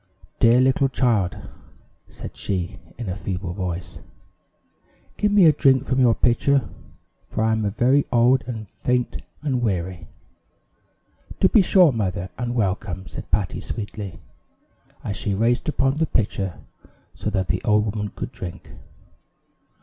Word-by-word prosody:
"Dear 115 Hz, +2 st, +6 dB
little 130 Hz, +1 st, +3 dB
child," 115 Hz, -9 st, +1 dB, 0.7 s
said -, -, -9 dB
she 90 Hz, -3 st, -3 dB, 0.2 s
in 120 Hz, -3 st, -5 dB
a 90 Hz, -, -2 dB
feeble 95 Hz, -2 st, -4 dB
voice, 90 Hz, -1 st, -5 dB, 1.2 s
"give 210 Hz, -, +1 dB
me 205 Hz, -3 st, +6 dB
a 160 Hz, -, +8 dB
drink 135 Hz, -2 st, +3 dB
from 130 Hz, -, 0 dB
your 120 Hz, -4 st, +5 dB
pitcher, 125 Hz, +1 st, +2 dB, 0.6 s
for 110 Hz, -, -1 dB
I 110 Hz, -, +2 dB
am 110 Hz, -2 st, +1 dB
very 125 Hz, +7 st, +3 dB
old, 125 Hz, +2 st, +4 dB
and 110 Hz, -4 st, -5 dB
faint, 125 Hz, +5 st, -2 dB, 0.2 s
and 130 Hz, -5 st, 0 dB
weary." 95 Hz, -5 st, -2 dB, 1.3 s
"To 190 Hz, -, +6 dB
be 215 Hz, -, +5 dB
sure, 180 Hz, -3 st, +5 dB
mother, 95 Hz, -5 st, -2 dB
and 120 Hz, -1 st, -3 dB
welcome," 95 Hz, -4 st, -1 dB
said -, -, -9 dB
Patty, 95 Hz, 0 st, -1 dB
sweetly, 105 Hz, -4 st, -6 dB, 0.9 s
as 100 Hz, -, -4 dB
she 100 Hz, -, -1 dB
raised 120 Hz, +7 st, +1 dB
up 135 Hz, -1 st, +1 dB
the 160 Hz, 0 st, +1 dB
pitcher 95 Hz, -4 st, -1 dB, 0.6 s
so -, -, -3 dB
that 95 Hz, -4 st, -1 dB
the 90 Hz, +3 st, 0 dB
old 105 Hz, 0 st, +3 dB
woman 105 Hz, -1 st, -3 dB
could -, -, -5 dB
drink. 110 Hz, -8 st, -8 dB
110 Hz, 140 wpm, -23 LUFS, 95-130 Hz, 1.3 s, a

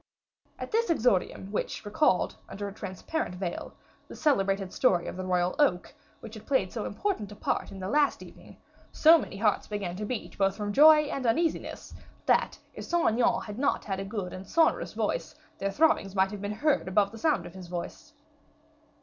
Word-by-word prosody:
At -, -, -7 dB
this 465 Hz, +1 st, +1 dB
exordium, 210 Hz, -, +1 dB
which 210 Hz, -, -3 dB
recalled, 205 Hz, -, +2 dB
under 205 Hz, +1 st, -5 dB
a 200 Hz, -, -7 dB
transparent 195 Hz, -, -4 dB
veil, 180 Hz, -1 st, -5 dB, 0.3 s
the -, -, -10 dB
celebrated 195 Hz, -, +1 dB
story 180 Hz, -9 st, +2 dB
of -, -, -5 dB
the 185 Hz, -, -5 dB
royal 180 Hz, -1 st, +1 dB
oak, 180 Hz, -12 st, +2 dB, 0.3 s
which 220 Hz, -, -10 dB
had 215 Hz, -, -11 dB
played 230 Hz, -10 st, +1 dB
so 220 Hz, -, -3 dB
important 215 Hz, -, -3 dB
a -, -, -9 dB
part -, -, -2 dB
in 195 Hz, -, -9 dB
the 185 Hz, -, -4 dB
last 290 Hz, +6 st, +2 dB
evening, -, -, -15 dB, 0.3 s
so 325 Hz, +1 st, +6 dB
many 195 Hz, -, -7 dB
hearts 210 Hz, 0 st, +1 dB
began 200 Hz, -4 st, -4 dB
to 210 Hz, -, -4 dB
beat, 235 Hz, -1 st, -5 dB
both 195 Hz, 0 st, +2 dB
from 205 Hz, -1 st, -3 dB
joy 305 Hz, +3 st, +8 dB
and 275 Hz, -4 st, -3 dB
uneasiness, 325 Hz, +8 st, -1 dB, 0.3 s
that, -, -, +2 dB, 0.2 s
if -, -, -8 dB
Saint 345 Hz, -1 st, +2 dB
Aignan 235 Hz, +2 st, +1 dB
had 210 Hz, +2 st, -7 dB
not 285 Hz, -, 0 dB
had 195 Hz, -2 st, -3 dB
a -, -, -3 dB
good 195 Hz, -3 st, -5 dB
and 185 Hz, +1 st, -8 dB
sonorous 325 Hz, +6 st, +2 dB
voice, -, -, -2 dB, 0.2 s
their 195 Hz, -, -1 dB
throbbings 195 Hz, -5 st, +2 dB
might 190 Hz, +1 st, +2 dB
have 205 Hz, -2 st, -7 dB
been 205 Hz, 0 st, -3 dB
heard 280 Hz, +5 st, +1 dB
above 200 Hz, +1 st, +2 dB
the 225 Hz, -, -10 dB
sound 310 Hz, +1 st, +1 dB
of -, -, -10 dB
his 185 Hz, -2 st, -10 dB
voice. 180 Hz, -, -7 dB
205 Hz, 195 wpm, -28 LUFS, 190-285 Hz, 0.3 s, joy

